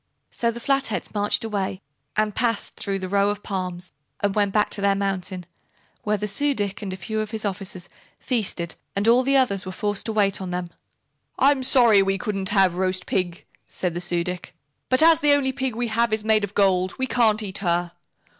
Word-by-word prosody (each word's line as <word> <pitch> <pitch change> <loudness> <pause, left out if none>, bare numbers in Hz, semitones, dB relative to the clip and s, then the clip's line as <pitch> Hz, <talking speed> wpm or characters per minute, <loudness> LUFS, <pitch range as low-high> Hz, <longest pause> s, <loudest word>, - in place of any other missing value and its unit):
So 235 - 0
the 235 +1 -4
Flatheads 250 -7 -1
marched 205 +1 +1
away 200 -4 -2 0.4
and 215 -1 +1
passed 230 -1 -1
through 195 -1 -2
the 190 -1 -5
row 200 +1 +2
of 205 0 -4
palms 185 -2 -4 0.3
and 205 -1 +1
went 205 -1 +1
back 210 +1 +1
to 200 - -5
their 200 0 +3
mountain, 190 -2 -3 0.6
where 210 0 0
the 210 +1 -3
Su 285 +8 +2
dic 205 -2 -2
and 200 -2 -4
a 185 - -5
few 220 +3 -3
of 215 -1 -2
his 220 -1 -5
officers 190 -2 -4 0.3
feasted 195 -9 -1 0.2
and 200 +2 0
all 240 +2 +6
the 275 +1 +3
others 200 -8 +2
were 185 - -6
forced 205 +2 -2
to - - -1
wait 205 -2 +1
on 185 - -4
them. 180 -1 -4 0.7
"I'm 275 0 +4
sorry 240 -5 +5
we 195 0 +1
couldn't 195 0 -3
have 190 -4 +3
roast 185 -1 0
pig," 180 -2 -2 0.2
said 180 -2 -3
the 175 - -4
Su 175 -1 -1
dic, 180 0 -6 0.3
"but 255 +4 +4
as 325 0 +6
the 295 -1 +4
only 275 -2 +2
pig 260 -3 -2
we 240 0 -2
have 230 +1 +1
is 215 -1 0
made 215 -1 +3
of 205 0 -4
gold, 185 -2 +2
we 260 - 0
can't 225 -4 +2
eat 195 -2 -3
her. 175 -2 0
205 Hz, 210 wpm, -23 LUFS, 185-225 Hz, 0.7 s, all